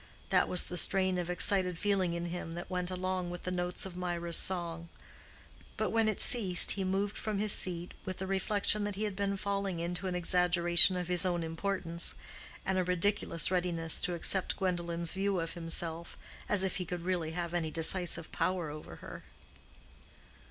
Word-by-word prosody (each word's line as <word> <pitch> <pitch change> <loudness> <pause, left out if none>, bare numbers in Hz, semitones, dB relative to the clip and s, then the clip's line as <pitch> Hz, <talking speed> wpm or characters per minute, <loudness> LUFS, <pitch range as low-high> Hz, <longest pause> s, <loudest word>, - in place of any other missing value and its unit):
That - - +3
was 180 - +4
the 180 - +1
strain 185 +1 +1
of 175 0 -4
excited 180 0 +3
feeling 190 -3 0
in 170 0 -4
him 170 -1 -6
that 175 +2 -8
went 180 -1 -2
along 185 -1 -3
with 175 0 -8
the 180 - -4
notes 180 0 -1
of 190 -2 -9
Mirah's 170 -2 -2
song; 170 -2 +2 0.9
but - - -1
when 225 -1 +2
it 215 - -3
ceased 190 -8 +5
he 195 - -2
moved 195 +2 -1
from 215 -2 -2
his 210 0 +2
seat 175 -1 0
with 185 -1 -5
the 190 - -5
reflection 200 +2 +2
that 205 -1 -4
he 210 - -3
had 205 -3 -3
been 200 0 -2
falling 195 -3 -3
into 175 +2 -3
an 180 - -3
exaggeration 175 0 +4
of 180 -1 -4
his 180 0 -1
own 175 -2 -1
importance, 170 0 -3 0.5
and 190 0 0
a - - +1
ridiculous 180 -1 +1
readiness 175 -3 0
to 180 -2 0
accept 185 +2 +3
Gwendolen's 170 -3 -2
view 195 0 -1
of 165 0 -4
himself, 165 0 -2 0.3
as 200 -2 +3
if 190 - -2
he 180 - -4
could 175 -1 -6
really 175 -3 -2
have 170 0 -4
any 165 -2 -1
decisive 165 +1 0
power 180 -5 -2
over 150 - -10
her. - - -9
180 Hz, 185 wpm, -31 LUFS, 170-190 Hz, 0.9 s, ceased